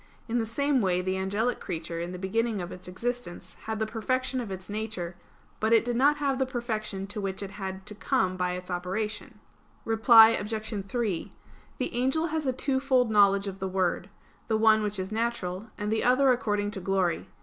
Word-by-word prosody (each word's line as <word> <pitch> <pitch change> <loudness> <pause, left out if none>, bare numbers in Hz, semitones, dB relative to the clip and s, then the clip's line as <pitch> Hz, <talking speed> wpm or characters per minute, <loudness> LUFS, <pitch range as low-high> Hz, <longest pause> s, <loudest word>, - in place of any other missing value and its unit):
In 240 +1 0
the 225 - -1
same 280 +3 +1
way, 180 -2 +1
the 185 0 -1
angelic 205 +6 -1
creature 165 0 -4
in 170 +1 -4
the 180 - -6
beginning 215 +4 -1
of 175 0 -5
its 185 - -9
existence 240 0 -5
had 220 0 -2
the 220 - 0
perfection 255 +4 -1
of 230 - -6
its 190 -1 -6
nature; 205 -5 -4 0.4
but 220 +1 +2
it 230 - +5
did 240 -1 -1
not 285 +4 +4
have 275 -2 0
the 265 - +2
perfection 220 -6 -3
to 205 +1 -5
which 195 0 -3
it 195 - -6
had 190 -1 -6
to 210 - -5
come 185 -2 0
by 180 -1 -1
its 180 0 -6
operation. 195 +4 -3 0.5
Reply 225 0 +8
Obj. 215 -2 -2
3: 210 -5 -2 0.5
The - - -2
angel 265 +7 +1
has 310 -2 -2
a - - +3
twofold 265 -2 +1
knowledge 200 -1 +5
of 195 -1 -5
the 190 - -2
Word; 185 0 -1 0.4
the 220 - +2
one 220 0 +5
which 210 -1 -1
is 190 +2 -4
natural, 220 -3 -2
and 210 0 -2
the 220 - +1
other 255 +2 +5
according 205 -4 0
to 195 - -5
glory. 185 -2 0
215 Hz, 200 wpm, -28 LUFS, 190-240 Hz, 0.5 s, Reply